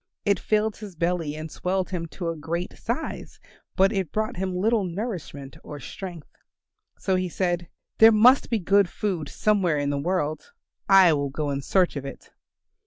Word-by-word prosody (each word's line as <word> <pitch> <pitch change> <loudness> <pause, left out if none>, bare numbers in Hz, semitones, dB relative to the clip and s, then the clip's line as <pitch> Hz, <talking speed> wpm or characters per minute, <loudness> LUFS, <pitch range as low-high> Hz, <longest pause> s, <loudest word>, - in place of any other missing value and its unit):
It 200 -1 +2
filled 215 0 0
his 205 -4 -9
belly 170 -2 -1
and 155 0 -7
swelled 185 0 -2
him 170 -3 -3
to 170 +1 -5
a 165 - -3
great 170 +3 -4
size, 240 +8 -5 0.4
but 195 +3 +4
it 190 -7 -2
brought 215 -2 -2
him 185 0 -2
little 215 +3 +2
nourishment 175 - -5
or 145 - -8
strength. 170 +3 -8 0.7
So 190 - 0
he 185 0 -1
said, 175 -1 -1 0.3
"There 225 +1 +9
must 240 +5 +5
be 235 - +1
good 200 0 +3
food 185 -7 -3
somewhere 195 -7 +1
in 145 0 0
the 140 - -1
world; 155 - -2 0.4
I 190 -4 +7
will 140 -1 -1
go 145 +1 -3
in 140 0 -2
search 180 +4 +2
of 140 - -4
it." 135 - -9
180 Hz, 175 wpm, -25 LUFS, 155-200 Hz, 0.7 s, There